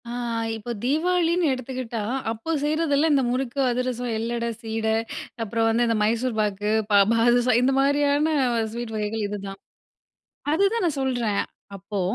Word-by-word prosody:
ஆ, - - -5 0.5
இப்ப 235 +2 -5
தீபாவளின்னு 340 +4 +2
எடுத்துக்கிட்டா 255 -2 -5 0.3
அப்போ 230 +9 -4
செய்றதெல்லாம் 305 0 +2
இந்த 275 -2 +3
முறுக்கு, 255 +1 -2
அதிரசம், 245 -1 -2
எள்ளட, 235 +1 -2 0.2
சீட 225 -1 -3 0.6
அப்புறம் 225 +1 0
வந்து 235 +2 +2
இந்த 230 -1 +1
மைசூர் 230 +2 0
பாக்கு, 205 0 -1 0.2
பா 205 - +6 0.2
பாதுசா 240 +2 +3
இந்த 265 +2 +3
மாதிரியான 285 +2 +2 0.4
ஸ்வீட் 235 -1 -5
வகைகள் 215 0 -2
இதுதான். 200 -1 -6 0.9
அதுதான் 400 +5 +2
நான் 300 -5 -1
சொல்றேன். 240 -6 0 0.3
அப்போ 200 +1 -5
240 Hz, 135 wpm, -24 LUFS, 225-285 Hz, 0.9 s, பா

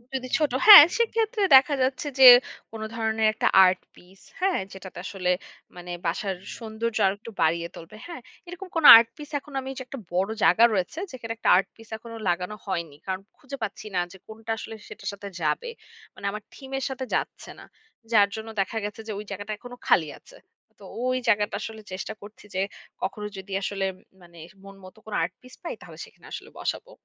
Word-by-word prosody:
যদি 255 -1 -3
ছোট 300 -4 0 0.2
হ্যাঁ, 405 -8 +14
সেক্ষেত্রে 455 -1 0
দেখা 285 +2 +2
যাচ্ছে 260 +3 -1
যে 260 - +10 0.4
কোনো 220 -1 -6
ধরনের 220 -1 +1
একটা - - 0 0.2
আর্ট 185 0 +2 0.2
পিস, 185 +2 -20 0.2
হ্যাঁ? 375 0 +1
যেটাতে 190 -2 -10
আসলে 180 -2 -1 0.4
মানে 175 0 -9
বাসার 185 +3 -2 0.2
সৌন্দর্য 225 0 -4
আরো 190 - +3
একটু 230 - -10
বাড়িয়ে 170 +1 +1
তুলবে। 165 +5 -12
হ্যাঁ? 340 -6 -8 0.3
এরকম 360 +2 -9
কোনো 325 -3 +5
আর্ট 230 0 +3
পিস 295 0 -10
এখন 285 +1 -16
আমি 265 - -6 0.2
একটা 275 - -8 0.2
বড় 190 +3 +1
জায়গা 220 +6 +5
রয়েছে, 195 - -2
যেখানে 230 -3 -7
একটা - - 0
আর্ট 195 +1 0
পিস 225 -1 -16
এখনো 230 +1 -11
লাগানো 180 +4 -2
হয়নি। 170 -7 -4
কারণ 190 0 -3 0.2
খুঁজে 275 +1 -9
পাচ্ছি 215 +1 -6
না - - +2
যে 190 - -13
কোনটা 220 +1 -7
আসলে 225 0 -8
সেটার - - -7
সাথে 200 0 -9
যাবে। 155 - -1 0.5
মানে - - -10
আমার 210 0 -7
থিমের 270 -1 -6
সাথে 265 0 -5
যাচ্ছে - - -4
না। - - -12 0.5
যার 205 -3 +5
জন্য 220 0 -7
দেখা 195 +4 -3
গেছে 210 +1 -7
যে - - -4
ওই 210 - -8
জায়গাটা 205 +2 -6
এখনো 245 +3 -11
খালি 160 - +4
আছে। - - -18 0.4
তো - - -16 0.2
ওই 255 0 +1
জায়গাটা 205 0 +2
আসলে 220 -1 -7
চেষ্টা 190 +3 -5
করছি 205 +1 -14
যে 190 - +1 0.4
কখনো 210 +2 -3
যদি 190 +1 -8
আসলে 195 0 -2 0.4
মানে 170 -1 -16 0.2
মন 195 0 -12
মতো 185 - -14
কোনো 215 - -6
আর্ট 180 +2 -3
পিস 255 0 -15
পাই, 340 - -4
তাহলে - - -13
সেখানে - - -20
আসলে - - -8
বসাবো। - - -4
220 Hz, 195 wpm, -25 LUFS, 190-255 Hz, 0.5 s, হ্যাঁ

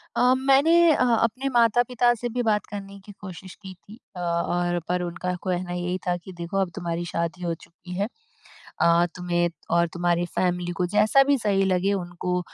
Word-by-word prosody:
अ, 250 +1 +4
मैंने 275 +4 +4 0.2
अ, - - +2
अपने 240 +3 +1
माता-पिता 240 +1 +3
से 240 +1 -4
भी 245 +2 -2
बात 210 -2 +1
करने 200 -1 -8
की 205 - -10
कोशिश 185 -1 -9
की 190 -2 -10
थी 210 +6 -16 0.2
अ, - - -7
और 175 0 0
पर 180 0 0
उनका 175 +1 -3
कहना 180 -1 -2
यही 180 +1 -2
था 175 - +2
कि 180 +2 -12
देखो 170 +3 -4
अब 190 -2 +1
तुम्हारी 170 0 -3
शादी 170 +2 -3
हो 170 - -1
चुकी 170 +2 -13
है। 200 +3 0 0.7
अ, 170 +1 +5
तुम्हें 175 -1 0 0.3
और 170 0 +3
तुम्हारी 175 0 +1
फ़ैमिली 180 -1 0
को 180 - +1
जैसा 215 +6 +5
भी 280 0 +2
सही 200 -4 +1
लगे 190 +1 +1
उनको 180 -1 -2
185 Hz, 185 wpm, -25 LUFS, 175-215 Hz, 0.7 s, अ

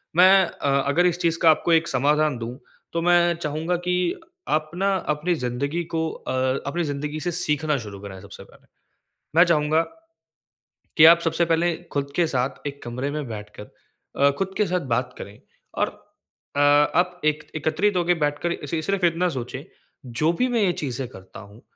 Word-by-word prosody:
मैं 190 +2 +7
अ, 140 -1 0
अगर 170 +5 +3
इस 175 0 +1
चीज़ 165 -1 +1
का 165 - +6
आपको 165 +2 +1
एक 165 0 +3
समाधान 145 +1 +1
दूँ 120 +2 -6 0.4
तो 165 - 0
मैं 175 0 +4
चाहूँगा 160 +2 -2
कि 180 - +2 0.5
आप 155 0 0
न 180 - -5 0.3
अपनी 175 +4 -1
ज़िंदगी 140 +6 -2
को 160 0 0
अ, - - -7 0.4
अपनी 170 +4 -1
ज़िंदगी 150 +1 -4
से 175 +2 -2
सीखना 155 -3 0
शुरू 100 -1 -9
करें 95 -2 -9
सबसे - - -11
पहले। - - -21 0.7
मैं 170 - +8
चाहूँगा 155 -1 +2 1.2
कि 155 - +7
आप 170 +1 +8
सबसे 165 +1 +1
पहले 165 +1 +1 0.2
खुद 140 -1 -2
के 175 - +3
साथ 130 -1 -2
एक 140 0 -10
कमरे 125 +4 -4
में 150 -1 -4
बैठकर 105 -1 -9 0.5
अ, 140 +1 +4
खुद 190 0 -2
के 210 - +2
साथ 180 0 0
बात 125 +1 -2
करें 100 +1 -9 0.4
और - - +1 0.7
अ, 145 - +1
आप 160 +5 +3
एक 155 0 +1
एकत्रित 160 +6 0
होके 175 0 +2
बैठकर 145 +4 -1
ए, - - -6
सि 160 +2 -2
सिर्फ़ 195 0 +1
इतना 170 +2 +1
सोचें, 130 -2 -5 0.4
जो 150 +8 0
भी 250 +9 0
मैं 235 -3 +1
ये 180 -3 +3
चीज़ें 130 -1 -3
करता 95 -4 -12
हूँ 100 +3 -15
155 Hz, 180 wpm, -23 LUFS, 140-175 Hz, 1.2 s, मैं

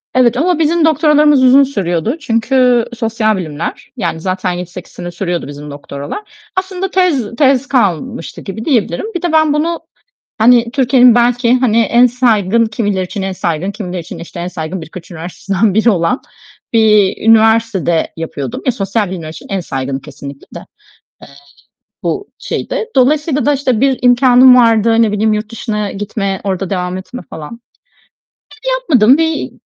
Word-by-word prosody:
Evet 245 -1 +3
ama 335 +3 +1
bizim 325 +1 +2
doktoralarımız 300 -3 +4
uzun 265 +2 +6
sürüyordu. 205 - -2
Çünkü 245 -2 +2
sosyal 225 -2 0
bilimler, 160 -3 -5
yani, 160 - -2
zaten 185 +1 -2
7-8 180 0 -7
sene 175 0 -7
sürüyordu 175 -2 -3
bizim 145 +1 -9
doktoralar. 145 - -9
Aslında 375 0 -3
tez 285 - 0
tez 270 0 +2
kalmıştı 190 - -1
gibi 215 +3 -7
diyebilirim. 230 - 0
Bir 350 - -2
de 350 -2 -1
ben 315 -2 +3
bunu, 330 +3 -1 0.6
hani 235 +1 +4
Türkiye’nin 250 -2 +4
belki 240 0 +2
hani 245 -3 +2
en 235 +3 +4
saygın, 230 -3 +2
kimileri 205 -4 -2
için 195 +2 -6
en 190 0 -3
saygın, 180 0 -2
kimileri 185 -4 -5
için 165 - -9
işte 170 +1 -9
en 175 - -3
saygın 170 +1 -5
birkaç 165 +3 -11
üniversitesinden 190 +4 -2
biri 220 +2 +3
olan 180 +5 0 0.5
bir 210 -4 +4
üniversitede 220 -6 +3
yapıyordum. 145 -5 -5
Ya 255 - +3
sosyal 200 -2 -2
bilimler 170 -4 -6
için 155 - -10
en 195 -1 -2
saygını 135 -4 -4
kesinlikle 140 -1 -11
de. - - -9 0.6
Eee, - - -12 0.8
bu 405 0 -3
şeydi. - - -3
Dolayısıyla 290 +1 +2
da 290 - +3
işte 260 -5 0
bir 270 -1 +2
imkânım 250 0 +6
vardı. 230 -1 +4
Ne 215 - +1
bileyim 215 +1 +1
yurt 215 0 -3
dışına 210 -3 -3
gitme, 200 -1 -3
orada 195 -1 -2
devam 180 -1 -2
etme 245 +7 -9
falan. 160 +9 -9 1.1
Ben - - 0
yapmadım. 270 - +4
Bir 320 -1 -1
225 Hz, 155 wpm, -14 LUFS, 185-255 Hz, 1.1 s, uzun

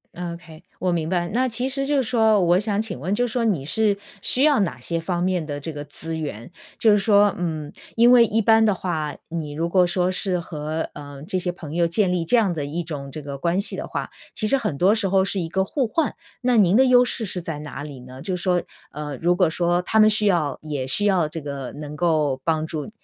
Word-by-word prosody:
，ok， 170 -2 -8 0.2
我 185 0 0
明 165 -2 -1
白。 175 -1 0
那 250 +8 0
其 250 +2 -2
实 275 0 -1
就 290 +1 +1
是 270 - +2
说， 220 -3 +3
我 175 +1 +4
想 210 0 0
请 210 - -5
问， 180 +8 -2
就 245 +4 +1
说 235 0 -1
你 185 -11 0
是 210 +6 +2 0.3
需 255 - +3
要 290 -3 +5
哪 170 -10 -2
些 165 +7 -2
方 175 +1 -2
面 180 -3 0
的 145 -1 -5
这 160 +3 -6
个 145 -1 -6
资 160 +3 -5
源？ 145 -5 -6 0.3
就 225 - +4
是 205 - +5
说， 205 0 +4
嗯， 160 -4 -3 0.2
因 235 +1 +6
为 240 -2 +7
一 225 +1 +1
般 225 +1 +5
的 210 - +3
话， 160 -5 -3
你 160 -3 -4
如 165 +3 -2
果 180 0 +4
说 180 +1 0
是 185 -1 +1
和， 155 -1 -4
呃， 145 -1 -10
这 185 +4 -2
些 180 0 -1
朋 160 -3 -9
友 170 0 +3
建 185 +2 +1
立 175 -2 -1
这 245 - +2
样 220 -6 +3
的 155 -4 -3
一 160 +5 -3
种 145 -4 -6
这 155 - -7
个 140 -1 -6
关 170 +6 0
系 200 - -1
的 - - -5
话， - - -4 0.2
其 215 - -1
实 275 - +3
很 215 - -2
多 190 +9 +3
时 215 -3 0
候 190 0 +3
是 195 0 -1
一 170 - -2
个 190 +3 0
互 250 +5 -1
换。 310 +5 -1 0.3
那 250 -1 +2
您 195 -3 +4
的 260 +3 +6
优 250 -1 +6
势 240 - -2
是 190 -3 -3
在 165 -3 -5
哪 145 -2 -7
里 145 -3 -9
呢？ 130 +1 -11
就 185 - -2
是 180 - -5
说， 180 -1 +1 0.3
呃， 150 -1 -6
如 175 +4 +2
果 180 -1 +3
说 175 +1 +1
他 220 - +1
们 215 0 +7
需 215 0 +3
要 165 -8 +1
也 145 -4 -4
需 205 +10 +1
要 180 -6 +2
这 165 +1 -6
个 140 -3 -6
能 150 0 -8
够 150 -5 +1
帮 160 -1 0
助， 155 +1 -5
175 Hz, 275 characters per minute, -23 LUFS, 155-210 Hz, 0.3 s, 为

